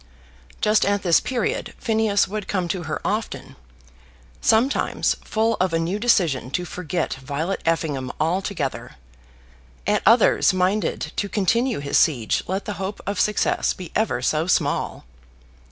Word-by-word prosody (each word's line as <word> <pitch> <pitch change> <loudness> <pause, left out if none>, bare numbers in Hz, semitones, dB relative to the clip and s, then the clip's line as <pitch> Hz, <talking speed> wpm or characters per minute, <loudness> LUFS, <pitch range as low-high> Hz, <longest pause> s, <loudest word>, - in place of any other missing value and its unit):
Just 215 0 +3
at 200 0 +1
this 170 -3 +5
period 245 -4 -2
Phineas 220 -3 +1
would 210 0 -5
come 185 -3 -1
to 185 - -2
her 150 - -2
often; 215 +2 -3 0.9
sometimes 230 +5 +2
full 225 +1 +1
of 185 -2 +1
a - - +3
new 175 +5 -1
decision 170 - +2
to 180 +6 -2
forget 175 0 -3
Violet 150 +8 -3
Effingham 145 -6 0
altogether, 165 -3 -2 0.9
at - - +2
others - - +5
minded 185 +3 0
to 200 - -1
continue 230 +6 +1
his 140 0 +2
siege 125 -9 +2
let 190 +2 -2
the 210 - -3
hope 195 +2 -4
of 200 -1 -2
success 210 -1 +1
be 180 -3 -9
ever 220 +1 0
so 155 +2 +1
small. 185 - 0
190 Hz, 140 wpm, -23 LUFS, 165-210 Hz, 0.9 s, this